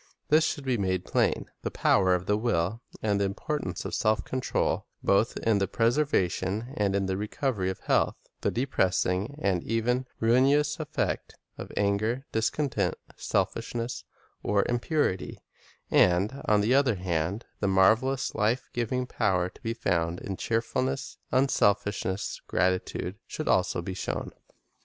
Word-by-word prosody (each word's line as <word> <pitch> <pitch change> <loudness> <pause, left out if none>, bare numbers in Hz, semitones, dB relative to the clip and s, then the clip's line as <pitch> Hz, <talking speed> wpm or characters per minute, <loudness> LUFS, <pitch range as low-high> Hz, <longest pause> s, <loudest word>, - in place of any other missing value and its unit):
This 155 +1 +5
should 145 -3 -2
be 125 -4 +1
made 95 -2 0
plain. - - 0
The - - -2
power 95 -2 +3
of 90 0 -3
the 105 - +2
will 110 -1 0 0.2
and 100 -2 +1
the - - +3
importance 100 - -3
of - - -4
self 110 0 +1
control, 130 -1 -1 0.2
both 100 +4 +2
in 110 -3 +2
the 95 - +1
preservation 115 - 0
and 100 -2 +1
in 100 -1 +1
the 95 0 -1
recovery 105 -1 -1
of 95 - -5
health, - - +2 0.2
the - - 0
depressing 95 -1 0
and 95 - +1
even 125 +3 0
ruinous 135 +6 +3
effect - - -2 0.2
of - - -7
anger, 110 +6 +1
discon 125 +6 0
tent, - - 0 0.2
selfishness, 120 +1 -2 0.4
or 100 -1 +1
impurity, 120 - 0 0.5
and, 95 +9 +3
on 105 -1 +4
the 110 +5 +2
other 135 -5 +4
hand, 90 +3 -2
the 100 - 0
marvelous 110 +8 +3
life 110 +4 0
giving 125 +2 -1
power 95 -7 +1
to - - -20
be 115 0 -2
found 85 -5 0
in 95 - -4
cheerful 115 +5 -1
ness, 135 +1 -3
unselfishness, 100 -6 +1
gratitude, 95 +1 -1
should 155 - -5
also 90 -2 +2
be 95 - -4
shown. 95 - -3
105 Hz, 145 wpm, -28 LUFS, 95-125 Hz, 0.5 s, This